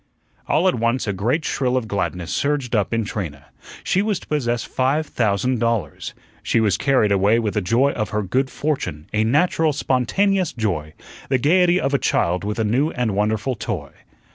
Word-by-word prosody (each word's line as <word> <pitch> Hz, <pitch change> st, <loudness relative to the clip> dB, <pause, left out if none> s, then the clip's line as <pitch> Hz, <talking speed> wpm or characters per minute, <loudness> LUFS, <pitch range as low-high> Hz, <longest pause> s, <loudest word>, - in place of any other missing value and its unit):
All 175 Hz, +4 st, +2 dB
at 185 Hz, -, +3 dB
once 115 Hz, +2 st, 0 dB
a 105 Hz, -, -1 dB
great 120 Hz, -, -1 dB
shrill 130 Hz, -1 st, 0 dB
of 120 Hz, -3 st, -2 dB
gladness 90 Hz, -4 st, -3 dB
surged 140 Hz, -4 st, 0 dB
up 105 Hz, -3 st, +1 dB
in 115 Hz, -1 st, 0 dB
Trina. 80 Hz, -10 st, -5 dB, 0.4 s
She 190 Hz, -, +1 dB
was 205 Hz, -2 st, 0 dB
to -, -, -13 dB
possess 120 Hz, -6 st, -1 dB
five 135 Hz, +5 st, 0 dB
thousand 120 Hz, 0 st, 0 dB
dollars. 115 Hz, -10 st, -2 dB, 0.3 s
She -, -, +1 dB
was 105 Hz, -3 st, +2 dB
carried 130 Hz, -4 st, +2 dB
away 100 Hz, +3 st, +3 dB
with 110 Hz, -3 st, -1 dB
the 105 Hz, -, 0 dB
joy 120 Hz, +9 st, +2 dB
of 110 Hz, -5 st, -3 dB
her 105 Hz, -1 st, -1 dB
good 130 Hz, +8 st, 0 dB
fortune, 135 Hz, -, -3 dB
a 105 Hz, 0 st, +2 dB
natural, 150 Hz, +5 st, +2 dB
spontaneous 180 Hz, +8 st, +1 dB
joy 85 Hz, -, -3 dB, 0.3 s
the 130 Hz, -, +3 dB
gaiety 175 Hz, +6 st, +3 dB
of 135 Hz, -4 st, -1 dB
a 140 Hz, -, +3 dB
child 90 Hz, +2 st, +1 dB
with 105 Hz, +1 st, -3 dB
a 110 Hz, -, +1 dB
new 125 Hz, +8 st, +1 dB
and 125 Hz, -8 st, -1 dB
wonderful 110 Hz, +5 st, 0 dB
toy. 110 Hz, -, -5 dB
120 Hz, 190 wpm, -21 LUFS, 105-140 Hz, 0.4 s, at